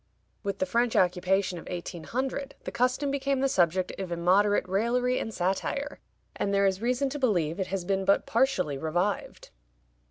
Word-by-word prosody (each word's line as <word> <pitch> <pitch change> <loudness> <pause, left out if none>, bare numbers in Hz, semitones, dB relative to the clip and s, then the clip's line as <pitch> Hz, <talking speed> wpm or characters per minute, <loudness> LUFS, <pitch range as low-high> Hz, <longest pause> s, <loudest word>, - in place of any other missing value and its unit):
With 200 -2 -3
the 185 - 0
French 235 +5 +1
occupation 180 0 +2
of - - -11
1800 250 - -4
the - - -5
custom 255 +3 +1
became 275 -1 0
the 275 - +2
subject 185 -5 +2
of 190 -2 -4
immoderate 185 +4 +3
raillery 240 +6 +1
and 225 - -4
satire, 210 +10 -2 0.4
and 200 - -1
there 200 0 +3
is 190 0 +1
reason 250 +4 +1
to 290 - -5
believe 180 - +1
it 190 - -1
has 190 -2 -3
been 195 0 0
but 195 +1 +3
partially 190 - +1
revived. 175 +7 -2
200 Hz, 165 wpm, -28 LUFS, 180-250 Hz, 0.4 s, immoderate